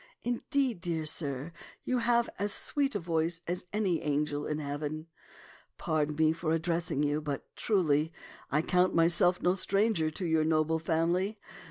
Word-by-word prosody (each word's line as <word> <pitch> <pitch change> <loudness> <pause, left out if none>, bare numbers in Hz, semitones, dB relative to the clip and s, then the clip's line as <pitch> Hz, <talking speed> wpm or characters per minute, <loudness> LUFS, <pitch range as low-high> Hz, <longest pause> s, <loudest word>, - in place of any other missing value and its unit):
Indeed, 245 -3 0
dear 165 -3 -2
sir, 145 -1 -3 0.3
you 255 -1 0
have 235 0 +3
as 205 +1 0
sweet 280 +2 -1
a - - +1
voice 165 -1 0
as 180 +1 -3
any 200 -5 0
angel 145 0 -1
in 150 - -1
heaven. 150 +1 -4 0.7
Pardon 150 -1 0
me 160 +1 +3
for 165 -1 -1
addressing 165 -3 0
you, 145 +1 +1
but, 145 -2 -4
truly, 160 -7 +2 0.4
I 150 +2 +1
count 180 +1 +2
myself 175 +2 +3
no 180 - +4
stranger 195 -3 +1
to 165 +4 -5
your 160 -2 +2
noble 160 0 +2
family. 170 +6 0
165 Hz, 155 wpm, -30 LUFS, 155-185 Hz, 0.7 s, no